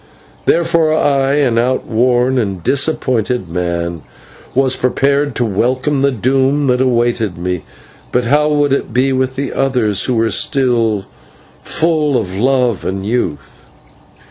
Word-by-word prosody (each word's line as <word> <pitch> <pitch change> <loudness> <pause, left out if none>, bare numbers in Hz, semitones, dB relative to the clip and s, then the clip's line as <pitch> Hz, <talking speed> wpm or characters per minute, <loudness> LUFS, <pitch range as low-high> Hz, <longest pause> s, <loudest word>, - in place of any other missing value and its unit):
Therefore 165 -2 +2
I, 140 -2 +1
an 130 -6 +2
outworn 125 +1 +1
and 100 -6 -3
disappointed 125 - 0
man, 85 -1 -3 0.5
was 135 0 +2
prepared 140 +2 0
to 120 - 0
welcome 130 +7 0
the 140 0 +2
doom 135 +4 +1
that 125 -1 +1
awaited 120 -6 0
me, 90 0 -3 0.5
but 125 0 0
how 150 +4 +2
would 145 -2 +2
it - - -2
be 130 +2 +2
with 130 0 -1
the 140 0 -3
others 125 -7 +1
who 125 - 0
were 115 0 +1
still 115 -7 +1 0.6
full 155 -4 +1
of 95 -4 -5
love 125 -1 +1
and 95 +1 -4
youth? 105 -9 -4
125 Hz, 135 wpm, -15 LUFS, 110-140 Hz, 0.6 s, Therefore